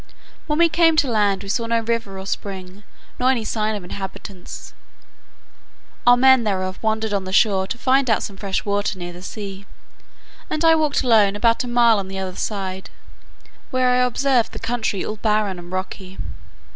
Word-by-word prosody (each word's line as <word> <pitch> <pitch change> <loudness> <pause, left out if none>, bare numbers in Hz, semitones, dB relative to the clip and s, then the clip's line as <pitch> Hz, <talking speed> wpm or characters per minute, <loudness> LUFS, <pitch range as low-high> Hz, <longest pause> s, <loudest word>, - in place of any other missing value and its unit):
When 300 -1 0
we 340 0 +6
came 330 0 +3
to 295 -3 +3
land 205 -4 +1
we 200 - -8
saw 230 +3 -1
no 230 0 +1
river 225 -4 -2
or 190 - -7
spring, 190 -1 -6 0.4
nor 255 +1 +3
any 240 -4 +1
sign 215 0 -1
of 205 - -6
inhabitants. 190 0 -8 1.3
Our 245 0 +8
men 260 -1 +6
therefore 185 -3 -1
wandered 220 -1 -1
on 195 -2 -1
the 185 - -5
shore 195 -1 +3
to 230 - -4
find 260 +1 +2
out 220 - +2
some 200 - -6
fresh 195 0 -3
water 205 -1 -1
near 175 -1 -6
the 175 - -11
sea, 195 0 -7 0.8
and 310 +1 -1
I 325 - +7
walked 305 -4 +1
alone 215 -5 +4
about 230 +3 +2
a - - -6
mile 235 -3 +4
on 195 - -5
the 195 0 -6
other 190 -1 -4
side, 190 -3 -4 0.8
where 255 -1 +2
I 250 - +3
observed 250 0 +1
the - - -6
country 225 -5 -2
all 215 - -4
barren 210 -4 0
and 175 0 -11
rocky. 185 0 -5
215 Hz, 185 wpm, -21 LUFS, 195-245 Hz, 1.3 s, Our